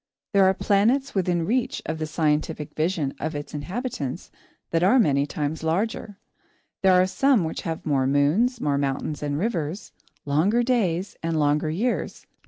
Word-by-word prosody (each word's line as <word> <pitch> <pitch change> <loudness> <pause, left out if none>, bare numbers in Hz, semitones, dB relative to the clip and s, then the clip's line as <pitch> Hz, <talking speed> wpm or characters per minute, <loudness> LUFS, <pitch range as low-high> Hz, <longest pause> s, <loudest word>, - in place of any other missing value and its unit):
There 195 -1 +5
are 190 0 +4
planets 230 +9 +2
within 175 -3 0
reach 245 +5 0
of 160 0 -3
the 155 - -2
scientific 150 -1 -1
vision 155 -3 -1
of 155 +1 -3
its 145 0 -6
inhabitants 165 - -4 0.4
that 165 - +1
are 195 +9 +5
many 145 - +3
times 150 +1 -3
larger. 195 +5 -2 0.6
There 185 -1 +5
are 185 - +5
some 255 +2 +2
which 160 - -4
have 165 -2 -5
more 135 -3 +1
moons, 160 - +2
more 140 -6 0
mountains 140 +2 -2
and 145 -1 -2
rivers, 175 -2 -3 0.3
longer 175 +12 +2
days, 200 -7 0
and 165 -1 -1
longer 150 +1 +2
years. 220 +10 -2
165 Hz, 160 wpm, -24 LUFS, 150-200 Hz, 0.6 s, There